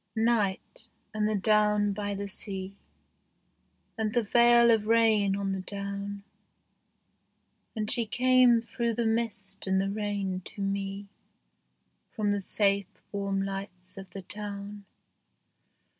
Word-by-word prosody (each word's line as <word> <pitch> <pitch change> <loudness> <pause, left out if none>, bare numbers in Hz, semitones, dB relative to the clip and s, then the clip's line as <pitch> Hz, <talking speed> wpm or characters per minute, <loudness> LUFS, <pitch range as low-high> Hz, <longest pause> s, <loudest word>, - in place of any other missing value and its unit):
NIGHT, 225 - 0 0.3
and 215 0 0
the 215 - 0
down 210 0 +2
by 205 0 -3
the 200 +1 -4
sea, 195 -1 -3 1.2
And 220 0 -1
the 240 - +3
veil 235 +2 +5
of 215 -2 +2
rain 220 -3 +3
on 200 -1 -2
the 190 - -2
down; 200 +1 -5 1.5
And 215 -1 -2
she 235 -2 +1
came 250 0 +4
through 235 -1 -2
the 235 - 0
mist 210 -4 -2
and 190 0 +2
the 195 +1 -1
rain 200 -3 -2
to 205 - -8
me 195 0 -3 1.1
From 210 -3 0
the 205 0 0
safe 200 -1 0
warm 200 -1 -1
lights 195 -2 -6
of 195 -1 -10
the 190 +1 -8
town. 205 0 -7
205 Hz, 130 wpm, -28 LUFS, 195-220 Hz, 1.5 s, veil